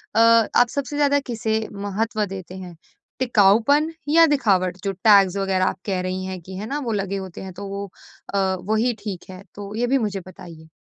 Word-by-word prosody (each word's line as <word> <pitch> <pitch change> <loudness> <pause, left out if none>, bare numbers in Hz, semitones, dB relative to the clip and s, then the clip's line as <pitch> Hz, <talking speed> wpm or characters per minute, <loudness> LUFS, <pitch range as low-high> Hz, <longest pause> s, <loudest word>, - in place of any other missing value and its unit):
अ, - - +4
आप 230 +1 +5
सबसे 280 +2 -4
ज़्यादा 285 -1 +3
किसे 225 -4 -2
महत्व 210 +2 -2
देते 185 -2 -8
हैं, 180 -2 -9 0.4
टिकाऊपन 240 +6 +3 0.2
या 330 +2 +7
दिखावट? 195 - +1
जो 195 - 0
टैग्स 195 -1 +4
वग़ैरह 190 -1 +1
आप - - -2
कह 190 -3 -1
रही 185 +1 -3
हैं 190 -1 -5
कि 185 +3 -10
है 205 - -5
ना 285 +5 -2
वो 230 - -1
लगे 200 -2 -2
होते 190 -2 -7
हैं, 190 -1 -8
तो 200 +3 -7
वो 200 +1 -5 0.5
अ, - - +1 0.2
वही 220 +6 0
ठीक 195 -5 -6
है। 185 +1 -10
तो 205 0 -8
यह 240 +2 0
भी 270 +2 +3
मुझे 210 -5 -2
बताइए? 165 -3 -12
200 Hz, 200 wpm, -22 LUFS, 190-230 Hz, 0.5 s, या